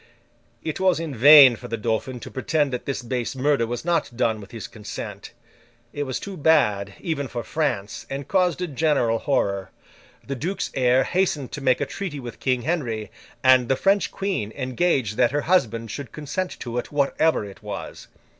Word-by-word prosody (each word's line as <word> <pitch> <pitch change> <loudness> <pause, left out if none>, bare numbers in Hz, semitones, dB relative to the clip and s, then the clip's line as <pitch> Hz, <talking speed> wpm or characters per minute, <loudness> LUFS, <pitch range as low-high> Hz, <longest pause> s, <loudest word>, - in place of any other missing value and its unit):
It 160 -2 -3
was 185 -3 +3
in 165 -3 -4
vain 140 +1 +9
for - - -10
the 115 - -3
Dauphin 115 +3 -2
to - - -9
pretend 145 +1 0
that 125 - -4
this 135 -2 -3
base 120 -1 -3
murder 135 -3 +1
was 120 +6 -4
not 170 -3 +1
done 110 -3 +1
with 100 - -12
his 115 -2 -7
consent; 105 -2 -8 0.6
it 145 0 -2
was 130 -2 -3
too 200 -1 -7
bad, 115 - +2
even 145 -5 -2
for 120 -1 -5
France, 145 -11 -2
and 135 0 -5
caused 180 -2 +1
a - - -2
general 140 -6 +1
horror. 100 -9 0 0.6
The 140 - -4
duke's 170 +9 -3
heir 130 0 +3
hastened 175 -8 0
to 150 - -6
make 130 -1 +2
a - - +1
treaty 165 -1 -5
with 120 -3 -8
King 125 -2 0
Henry, 120 -10 -2 0.3
and 130 -2 +5
the 135 - +3
French 195 +7 +2
Queen 190 - -2
engaged 130 - 0
that 125 -2 +4
her 145 +3 -1
husband 115 - +1
should 140 -3 -6
consent 155 +5 -4
to 120 0 -3
it, - - -7
whatever 145 -2 +1
it 100 -1 -12
was. 105 -2 -7
135 Hz, 185 wpm, -24 LUFS, 115-155 Hz, 0.6 s, vain